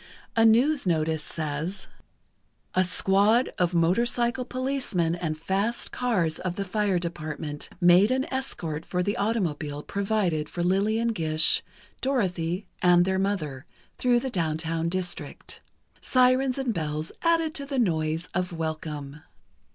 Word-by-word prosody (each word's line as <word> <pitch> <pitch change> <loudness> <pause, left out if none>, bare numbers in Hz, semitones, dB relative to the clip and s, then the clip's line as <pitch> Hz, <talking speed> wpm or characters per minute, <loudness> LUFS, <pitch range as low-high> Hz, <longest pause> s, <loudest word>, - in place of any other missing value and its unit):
A 225 0 +5
news 250 +3 +4
notice 160 -2 +1
says: 155 +5 -3 0.9
A 185 - +3
squad 200 +6 +3
of 175 -1 +1
motorcycle 235 +8 +2
policemen 255 -11 -1
and 165 -3 -3
fast 195 +8 -1
cars 185 -11 0
of 180 -1 -3
the 200 - -3
Fire 200 -1 +1
Department, 155 -3 -5
made 180 +3 +6
an 260 +1 +1
escort 165 - -3
for 180 +1 -1
the 205 +2 -1
automobile 160 -9 -1
provided 195 -7 -1
for 175 - -3
Lillian 210 +6 +2
Gish, 155 -7 +3 0.4
Dorothy 185 -8 -1 0.2
and 175 -1 +5
their 190 0 0
mother, 160 -8 -2 0.3
through 245 -1 +3
the 265 - -3
downtown 165 -2 -1
district. 180 0 -5 0.4
Sirens 255 +1 +3
and 265 -4 -1
bells 155 -2 -3
added 330 -2 +2
to 280 -2 -4
the 275 -1 -3
noise 160 -6 0
of 180 0 -1
welcome. 155 -3 -5
180 Hz, 130 wpm, -26 LUFS, 160-230 Hz, 0.9 s, made